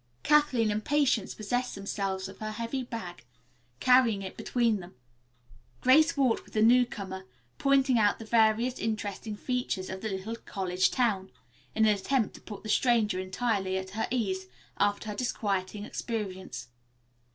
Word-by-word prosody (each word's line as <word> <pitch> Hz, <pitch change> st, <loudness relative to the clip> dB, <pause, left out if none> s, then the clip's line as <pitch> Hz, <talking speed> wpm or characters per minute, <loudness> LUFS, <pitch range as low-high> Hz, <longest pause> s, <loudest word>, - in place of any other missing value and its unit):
Kathleen 290 Hz, -7 st, +3 dB
and 210 Hz, +1 st, -2 dB
Patience 285 Hz, -6 st, +1 dB
possessed 245 Hz, +4 st, -2 dB
themselves 195 Hz, -1 st, -3 dB
of 195 Hz, -, -12 dB
her 215 Hz, -, -4 dB
heavy 230 Hz, +4 st, -3 dB
bag, 185 Hz, -, -7 dB, 0.6 s
carrying 250 Hz, -6 st, +4 dB
it 190 Hz, -, -7 dB
between 235 Hz, -4 st, +1 dB
them. 180 Hz, 0 st, -11 dB, 0.9 s
Grace 310 Hz, +5 st, +5 dB
walked 260 Hz, -5 st, +2 dB
with -, -, -18 dB
the 215 Hz, -, +3 dB
newcomer, 215 Hz, -6 st, +2 dB, 0.3 s
pointing 270 Hz, -3 st, +3 dB
out 205 Hz, -2 st, +3 dB
the 225 Hz, -, -9 dB
various 225 Hz, +2 st, +3 dB
interesting 215 Hz, -1 st, -3 dB
features 225 Hz, -5 st, -2 dB
of 190 Hz, 0 st, -6 dB
the 220 Hz, -, -3 dB
little 195 Hz, +4 st, -4 dB
college 185 Hz, -4 st, 0 dB
town, 205 Hz, -7 st, 0 dB, 0.5 s
in 220 Hz, 0 st, +4 dB
an 215 Hz, -, +5 dB
attempt 220 Hz, +3 st, 0 dB
to -, -, -13 dB
put 205 Hz, -3 st, -9 dB
the -, -, -7 dB
stranger 215 Hz, -4 st, +2 dB
entirely 190 Hz, 0 st, -1 dB
at 190 Hz, 0 st, -5 dB
her 220 Hz, +3 st, -2 dB
ease 190 Hz, -6 st, -1 dB, 0.3 s
after 205 Hz, +1 st, +1 dB
her 210 Hz, -, -4 dB
disquieting 205 Hz, -3 st, -2 dB
experience. 190 Hz, -, -5 dB
215 Hz, 150 wpm, -29 LUFS, 195-245 Hz, 0.9 s, Grace